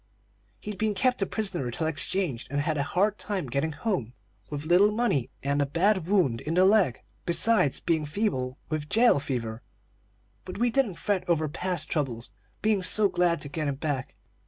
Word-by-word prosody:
"He'd 210 -1 -6
been 215 -1 0
kept 250 +4 +1
a 195 - +1
prisoner 190 - -1
till 160 +7 -3
exchanged, 155 -3 0
and 145 +2 -1
had 155 +2 0
had - - -3
a 140 - -2
hard 205 +3 +1
time 200 -6 -3
getting 140 +5 -2
home, 160 - -2 0.4
with 145 0 -5
little 180 +5 +5
money 215 - 0
and 140 +1 +1
a - - +2
bad 180 +3 +1
wound 175 - +2
in 160 +2 -3
the 185 +1 +5
leg, 195 - +3 0.2
besides 170 - +2
being 160 -3 0
feeble 145 -8 -2
with 155 -2 -4
jail 230 -9 +4
fever. 120 -5 -4 0.8
But 185 - -8
we 240 +2 +1
didn't 230 -7 +1
fret 200 +1 -1
over 160 -2 +2
past 175 +1 -3
troubles, 120 -8 -3 0.3
being 215 -2 +2
so 205 +2 +3
glad 175 -4 +1
to 145 - -6
get 155 0 -3
him 140 - -1
back. 140 -2 -3
170 Hz, 185 wpm, -27 LUFS, 140-205 Hz, 0.8 s, little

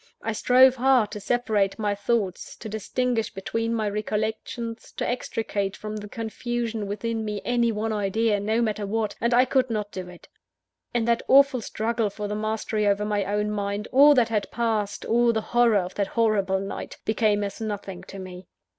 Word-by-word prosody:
I 225 - -1
strove 255 +4 +5
hard 250 -4 +3
to 210 - -5
separate 210 -3 0
my 210 -2 0
thoughts; 205 -2 -2
to - - -9
distinguish 225 +2 -1
between 225 +3 -3
my 220 -1 -1
recollections; 220 +2 -3
to - - -3
extricate 210 -5 -2
from 215 0 -6
the 210 0 -7
confusion 230 0 -3
within 225 +2 -3
me 210 -1 -3
any 240 -1 +2
one 220 +1 -2
idea, 210 +1 +1
no 220 +3 +1
matter 215 -2 -2
what 215 0 -1
and 235 - +1
I 245 +2 +5
could 255 -1 +1
not 210 -2 -2
do 185 -1 -6
it. 175 -1 -14 0.6
In 240 -2 0
that 235 0 +2
awful 275 -2 +5
struggle 225 0 -1
for 205 +1 -5
the 205 - -3
mastery 215 0 -1
over 205 +1 +2
my 205 -2 0
own 210 +1 -1
mind, 205 0 -2
all 290 +2 +7
that 240 -3 +3
had 210 -3 -1
passed, 220 -3 -1
all 235 +1 +3
the 220 -1 -1
horror 240 -3 +5
of 185 -1 -2
that 200 -1 -1
horrible 200 -4 +1
night, 195 +1 -6
became 215 -2 +2
as 200 +3 -5
nothing 205 -4 -5
to 195 - -10
me. 185 -1 -9
215 Hz, 185 wpm, -25 LUFS, 205-235 Hz, 0.6 s, all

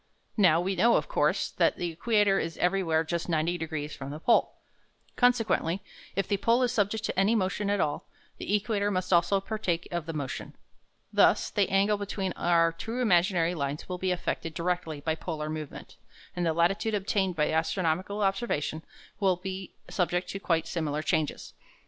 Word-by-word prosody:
Now 180 -7 +5
we 190 +2 -1
know, 235 +4 +4
of - - +1
course, - - +1
that - - +2
the 175 -1 -2
equator 205 +2 +2
is 165 0 -4
everywhere 180 -3 +1
just 170 +2 -3
90 165 +2 0
degrees 155 -2 -4
from 135 0 -7
the 150 +2 -6
pole. 235 - +3 0.6
Consequently, 225 -8 +2 0.4
if 195 - 0
the 200 - +1
pole 230 +5 +3
is 245 - +1
subject 215 -1 0
to 190 - -1
any 205 +4 +3
motion 200 0 0
at 205 0 +1
all, 145 -4 -1 0.3
the 205 - 0
equator 205 -1 0
must 185 -1 -1
also 175 +3 +4
partake 190 -4 -2
of 170 -2 -3
the 165 - -3
motion. 140 -4 -5 0.6
Thus - - +4
the 200 -2 +1
angle 200 +2 +3
between 200 -2 -3
our 165 -1 +3
two 225 +9 -5
imaginary 180 -6 +3
lines 140 -2 -3
will 180 -1 -4
be 185 - 0
affected 165 -2 -3
directly 170 -3 -2
by 160 +2 0
polar 155 -2 -4
movement, 155 -2 -7 0.4
and 175 -1 0
the - - +3
latitude 195 +6 +1
obtained 195 -2 0
by 150 -1 +1
astronomical 180 +5 0
observation 195 -7 -1 0.4
will 190 -3 +3
be 190 +1 -7
subject 180 -1 -1
to 195 - -4
quite 165 -4 0
similar 155 -3 -2
changes. 155 -2 -1
180 Hz, 175 wpm, -28 LUFS, 165-200 Hz, 0.6 s, Now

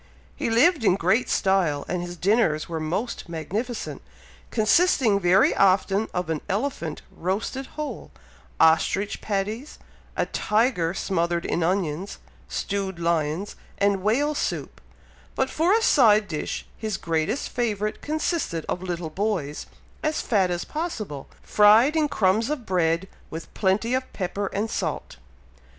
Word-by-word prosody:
He 260 - -2
lived 275 +5 +4
in 185 - +4
great 195 +6 +1
style, 180 -7 +1
and 180 0 -2
his 175 0 -6
dinners 180 -6 +2
were 165 -1 -3
most 180 +7 -3
magnificent, 210 +9 -4 0.5
consisting 225 - +3
very 185 +1 +4
often 195 +2 +3
of 180 -1 -2
an 155 - -2
elephant 195 - -2
roasted 215 +9 -3
whole, 300 -1 -5 0.5
ostrich 165 +5 +3
patties, 215 +7 -3 0.4
a - - +2
tiger 210 -6 +1
smothered 170 -3 -1
in 175 - -1
onions, 175 0 -1 0.3
stewed 195 -2 -3
lions, 170 +2 -1 0.2
and 200 -1 +2
whale 265 +9 +2
soup; - - -3 0.5
but 265 - 0
for 330 +4 +2
a 450 +2 +4
side 215 - +5
dish 155 -5 -4
his 215 -3 -2
greatest 165 - -1
favourite 215 -3 -2
consisted 305 - -2
of 180 - -2
little 175 -3 -4
boys, 180 -6 -2 0.3
as 310 0 0
fat 195 -5 +2
as 175 -1 -2
possible, 220 - -5 0.2
fried 220 +8 +5
in 310 -2 +3
crumbs 215 +3 +2
of 295 -6 -3
bread, 175 -1 +1 0.2
with 160 +1 -8
plenty 210 +4 +1
of 260 0 -1
pepper 195 +1 -2
and 210 +3 -2
salt. - - -3
200 Hz, 135 wpm, -25 LUFS, 175-230 Hz, 0.5 s, side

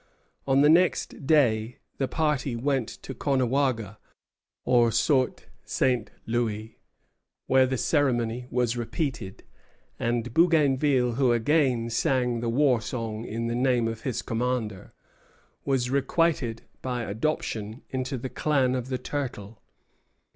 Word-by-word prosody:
On 135 0 +4
the 145 - +6
next 165 -4 +2
day 120 -7 +3 0.2
the 135 - +1
party 150 -5 0
went 130 -1 0 0.2
to 135 - -6
Caughnawaga, 130 -5 0 0.7
or 120 -2 +4
Saut 130 +3 +1 0.2
St. 125 -4 0 0.2
Louis, 110 -2 -2 0.7
where 130 0 +4
the 130 0 -1
ceremony 125 -4 0
was 125 -1 0
repeated; 120 - -4 0.6
and 120 0 -1
Bougainville, 145 -6 +3
who 130 -3 +3
again 120 -1 +1
sang 125 0 +1
the 115 0 -2
war 125 -1 +3
song 115 -1 -4
in 115 +1 -4
the 115 - -1
name 125 -1 +2
of 115 -1 -5
his 125 -4 -3
commander, 115 -4 -2 0.7
was 130 -3 0
requited 140 -3 0 0.2
by 125 -2 -3
adoption 110 -1 -3
into 130 +1 -2
the 125 - -5
clan 135 -4 +1
of 125 -1 -2
the 130 - -1
Turtle. 115 -8 -5
125 Hz, 125 wpm, -26 LUFS, 115-135 Hz, 0.7 s, the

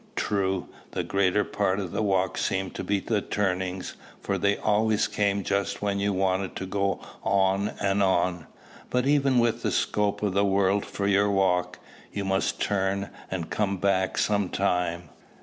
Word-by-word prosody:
True, 95 -2 0 0.3
the - - -1
greater 100 +1 +2
part 100 -1 0
of 95 -4 -4
the - - -1
walk 95 -3 +1
seemed 95 -1 -1
to - - -5
be 100 0 +1
the 105 +1 -1
turnings, 95 -2 -2 0.3
for 100 -1 -2
they 100 +2 +2
always 110 0 +2
came 100 -1 0
just 100 +1 -1
when 100 -1 0
you 100 +1 +1
wanted 95 0 0
to 95 - -4
go 100 +1 -1 0.2
on 95 +1 +2
and 100 0 +1
on; 90 -3 +1 0.4
but, 125 0 +1
even 140 -2 +3
with 120 -1 +2
the - - 0
scope 105 0 0
of 100 -3 +1
the 100 +1 +3
world 100 0 +2
for 100 - -3
your 100 +1 +3
walk, 95 -2 +1 0.3
you 100 -1 -3
must 95 0 0
turn 100 -1 0 0.2
and 90 -3 -4
come 100 -2 0
back 95 0 +1
some 100 -3 +1
time. 90 -3 -1
100 Hz, 170 wpm, -26 LUFS, 95-100 Hz, 0.4 s, even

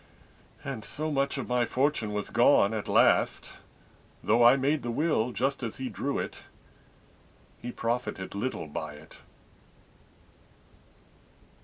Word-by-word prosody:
And 135 -7 -5
so 155 +1 -3
much 140 0 0
of 135 - -4
my 125 -1 +2
fortune 130 -3 0
was 105 -1 -3
gone 100 +2 +4
at 110 -2 -3
last, - - +2 0.7
Though 115 +3 +4
I 120 +2 +8
made 140 +2 +1
the 120 - -4
will 125 -3 +1
just 135 +3 -1
as 115 -3 -4
he 130 -1 -4
drew 140 0 -2
it, - - -5 1.2
He 120 - -5
profited 115 -6 -3
little 100 -3 -3
by 75 0 -6
it. 75 +1 -15
125 Hz, 130 wpm, -28 LUFS, 110-140 Hz, 1.2 s, I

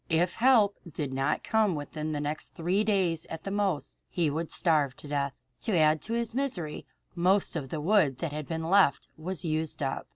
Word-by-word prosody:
If 170 +2 +1
help 225 -5 +5
did 145 -3 -4
not 135 +3 0
come 215 -5 +2
within 155 +1 -4
the 150 - -2
next 150 +1 -4
three 180 +5 +1
days 185 -6 +1
at 160 0 -7
the 195 - -4
most, 195 -6 -1
he 165 -4 0
would 160 +2 -3
starve 150 -6 +2
to 145 - -12
death. 140 -1 -1 0.3
To 215 -6 0
add 155 -1 +4
to 230 - -4
his 235 -1 -1
misery, 230 - -2 0.3
most 185 +2 +2
of 140 -5 -3
the 155 - -3
wood 155 -5 +3
that 155 +3 -3
had 150 -1 -5
been 160 -1 -3
left 190 -6 +4
was 180 +3 -4
used 155 -2 -1
up. 135 - -3
165 Hz, 200 wpm, -29 LUFS, 150-195 Hz, 0.3 s, help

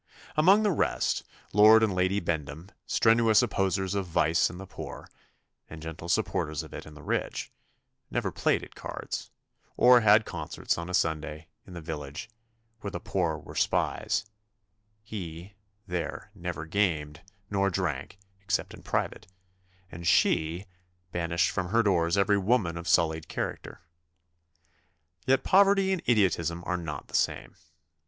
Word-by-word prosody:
Among 190 +8 +5
the 210 - +3
rest, 165 - 0 0.3
Lord 110 +2 +7
and 105 -3 +2
Lady 95 +2 +1
Bendham, 80 0 -4 0.2
strenuous 115 -1 +4
opposers 95 -4 0
of 100 -2 -2
vice 80 -1 +2
in 90 - -9
the 95 - -8
poor, - - -9 0.6
and 80 - -9
gentle 80 +1 -7
supporters 75 -3 0
of - - -12
it - - -8
in 75 - -12
the 75 - -12
rich, - - -2 0.6
never - - -1
played - - +1
at - - -11
cards, - - -6 0.5
or 125 -1 +7
had 110 0 +5
concerts - - -3
on 85 +1 -6
a 90 - 0
Sunday, 80 -2 -2 0.2
in 90 - -11
the 85 - -7
village, 75 +5 -6 0.5
where 100 - -5
the - - -5
poor 85 -5 -1
were 80 - -11
spies - - 0 0.8
he, 90 -3 -7 0.3
there, 90 +2 -4
never 85 -5 -5
gamed, 80 -5 -1 0.3
nor 100 -1 +2
drank, 85 -4 -3 0.2
except 95 -2 -1
in - - -12
private, - - -2 0.6
and 85 0 -6
she 80 +6 +2 0.5
banished 85 0 0
from 95 -1 -2
her 115 +4 +3
doors 85 -3 +2
every 100 +1 +3
woman 95 -4 +1
of 85 +1 -6
sullied 80 -1 +2
character. - - -5 1.5
Yet 135 0 +3
poverty 195 0 +4
and 185 - -2
idiotism 85 -6 +2
are 90 - -1
not 80 -5 -6
the - - -19
same. - - 0
90 Hz, 145 wpm, -28 LUFS, 80-105 Hz, 1.5 s, Lord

